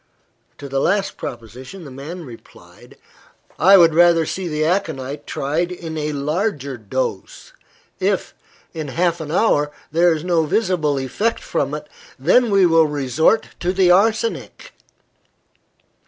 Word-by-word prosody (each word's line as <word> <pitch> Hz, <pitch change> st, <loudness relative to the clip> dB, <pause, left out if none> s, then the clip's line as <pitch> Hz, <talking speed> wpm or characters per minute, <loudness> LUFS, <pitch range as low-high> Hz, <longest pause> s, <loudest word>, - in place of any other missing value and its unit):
To 140 Hz, -, -8 dB
the 135 Hz, 0 st, -1 dB
last 200 Hz, +1 st, 0 dB
proposition, 130 Hz, -, -9 dB
the 140 Hz, -, -10 dB
man 155 Hz, +6 st, -8 dB
replied 120 Hz, -3 st, -15 dB, 0.6 s
"I 195 Hz, +5 st, +7 dB
would 165 Hz, -3 st, +6 dB
rather 170 Hz, 0 st, +5 dB
see 185 Hz, +3 st, -4 dB
the 155 Hz, -1 st, -1 dB
aconite 150 Hz, -6 st, -2 dB
tried 160 Hz, +6 st, -2 dB
in 165 Hz, -3 st, -7 dB
a 150 Hz, -1 st, -2 dB
larger 145 Hz, -1 st, -2 dB
dose. 110 Hz, -2 st, -5 dB, 0.5 s
If, -, -, -1 dB, 0.4 s
in 155 Hz, -2 st, -5 dB
half 170 Hz, +4 st, 0 dB
an 155 Hz, -, -6 dB
hour, 150 Hz, -6 st, +2 dB, 0.2 s
there 170 Hz, +3 st, +4 dB
is 160 Hz, -1 st, -2 dB
no 175 Hz, -2 st, +1 dB
visible 155 Hz, -5 st, 0 dB
effect 200 Hz, -, -2 dB
from -, -, -2 dB
it, -, -, -8 dB, 0.3 s
then 245 Hz, -2 st, +3 dB
we 195 Hz, -2 st, +4 dB
will 165 Hz, -2 st, +4 dB
resort 150 Hz, -, +1 dB
to 175 Hz, -, 0 dB
the 185 Hz, -1 st, +3 dB
arsenic." 220 Hz, -, 0 dB
160 Hz, 140 wpm, -20 LUFS, 145-180 Hz, 0.6 s, I